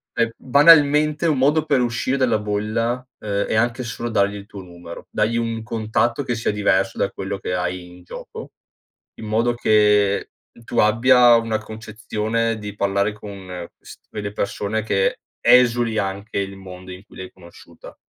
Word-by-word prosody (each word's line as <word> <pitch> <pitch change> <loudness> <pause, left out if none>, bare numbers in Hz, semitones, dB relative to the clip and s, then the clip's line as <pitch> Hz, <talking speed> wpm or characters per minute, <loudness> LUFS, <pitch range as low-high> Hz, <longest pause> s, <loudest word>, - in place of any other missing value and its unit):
E 115 -1 0
banalmente 150 +2 +4
un 155 -5 +2
modo 150 +4 +2
per 140 -4 +2
uscire 120 +2 -1
dalla 125 -5 +2
bolla, 110 +4 -2
ehm, 100 -1 -2
è - - -2
anche 120 +3 0
solo 120 0 -5
dargli 100 -2 +1
il 100 - -9
tuo 100 -1 -10
numero. 85 -1 -11
Dagli 110 +2 0
un 115 -1 -2
contatto 115 +3 -1
che 120 - -2
sia 115 - -1
diverso 95 -2 0
da - - 0
quello 95 +1 -5
che 90 - -4
hai 90 0 -3
in 90 0 -15
gioco, - - -10 0.7
in - - -7
modo 115 +3 +1
che 105 -3 +2 0.3
tu 120 - -2
abbia 120 +2 +5
una 115 -1 -1
concezione 110 +1 -3
di 105 -1 -8
parlare 100 +1 0
con 100 -3 -10 0.3
quest - - -15
quelle 100 -1 -6
persone 105 +1 -2
che 100 -3 0 0.2
esuli 120 -2 +4
anche 100 +2 -3
il 100 0 -4
mondo 95 -1 -11
in 90 +1 -10
cui - - -19
l'hai 95 -1 -8
conosciuta. 85 -2 -15
110 Hz, 165 wpm, -21 LUFS, 100-120 Hz, 0.7 s, abbia